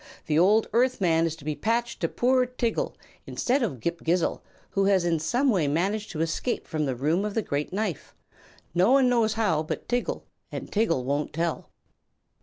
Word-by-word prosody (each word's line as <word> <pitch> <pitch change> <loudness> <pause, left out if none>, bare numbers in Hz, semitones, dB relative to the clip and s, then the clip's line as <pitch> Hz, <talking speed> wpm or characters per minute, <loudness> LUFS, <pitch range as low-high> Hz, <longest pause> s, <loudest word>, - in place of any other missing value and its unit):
The 155 0 +2
old 210 +5 +4
Earth 250 +2 +2
man 165 -3 +3
is 160 - -4
to 155 -3 -15
be 155 - -1
patched 235 +5 -1
to - - +1
poor 255 0 +2
Tiggle, 245 -2 -2 0.3
instead 265 +3 0
of 180 - -2
Ghip 170 +6 -2
Ghisizzle, 170 +1 +1 0.3
who 195 0 +1
has 195 -3 +3
in 165 -2 +1
some 245 - +1
way 175 -9 +1
managed 195 +8 0
to 160 - -4
escape 165 +9 -1
from 155 -1 -1
the 130 - -1
Room 155 +9 +1
of 210 -1 -3
the 225 - +1
Great 145 -2 -2
Knife 195 -4 -3 0.6
no 180 +7 +4
one 270 -2 +5
knows 230 -3 +2
how 205 -9 +1
but 155 - -5
Tiggle, 245 0 -1 0.3
and - - -6
Tiggle 205 - +1
won't 140 +3 -2
tell." 165 +1 -2
190 Hz, 195 wpm, -26 LUFS, 160-230 Hz, 0.6 s, one